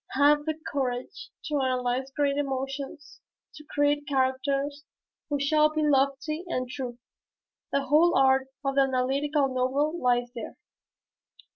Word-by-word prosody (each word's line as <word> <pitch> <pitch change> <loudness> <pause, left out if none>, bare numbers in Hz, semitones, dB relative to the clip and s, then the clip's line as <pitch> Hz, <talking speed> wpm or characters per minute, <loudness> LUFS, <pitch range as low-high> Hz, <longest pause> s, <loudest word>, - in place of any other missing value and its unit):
"Have 295 +2 +4
the 315 -1 -1
courage 275 - -3 0.2
to 295 -3 0
analyze 255 0 -1
great 280 0 0
emotions 275 +1 -4 0.3
to 300 - -12
create 290 0 0
characters 275 +2 0 0.5
who 290 -1 0
shall 305 +2 +3
be 310 0 -1
lofty 285 +3 +1
and 255 -7 -2
true. 250 -2 -6 0.7
The 280 - +1
whole 310 +5 +4
art 265 0 +4 0.2
of 275 - +1
the 275 - +4
analytical 270 +2 +1
novel 265 +4 0
lies 245 -1 +1
there." 230 - -7
275 Hz, 130 wpm, -27 LUFS, 260-295 Hz, 0.7 s, Have